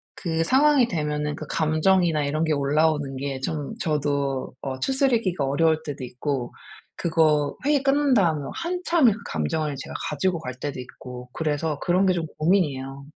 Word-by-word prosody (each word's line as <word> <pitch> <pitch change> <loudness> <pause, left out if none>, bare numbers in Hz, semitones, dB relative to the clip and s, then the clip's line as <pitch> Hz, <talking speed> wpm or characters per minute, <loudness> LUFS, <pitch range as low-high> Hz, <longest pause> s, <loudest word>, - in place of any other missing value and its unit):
그 165 -2 -1
상황이 270 - +4
되면은 150 -3 -2
그 155 - -7
감정이나 155 0 +2
이런 155 +3 0
게 160 - 0
올라오는 145 0 +1
게 135 -1 -3
좀 150 +6 -3
저도 140 -7 -1
어 130 -1 -4
추스르기가 230 - +1
어려울 160 +3 +2
때도 145 -3 -6
있고 125 0 -3 0.4
그거 155 -3 +2
회의 290 -2 +3
끝난 280 0 +3
다음에 160 -8 +2
한참을 340 - +2
그 215 - -9
감정을 140 - -1
제가 - - -7 0.2
가지고 170 +3 0
갈 130 -5 -6
때도 145 -3 -4
있고 125 0 -9
그래서 150 -1 -1
그런 185 +2 +2
게 185 - +4
좀 170 -2 -2
고민이에요. 140 -6 0
155 Hz, 335 characters per minute, -24 LUFS, 140-185 Hz, 0.4 s, 상황이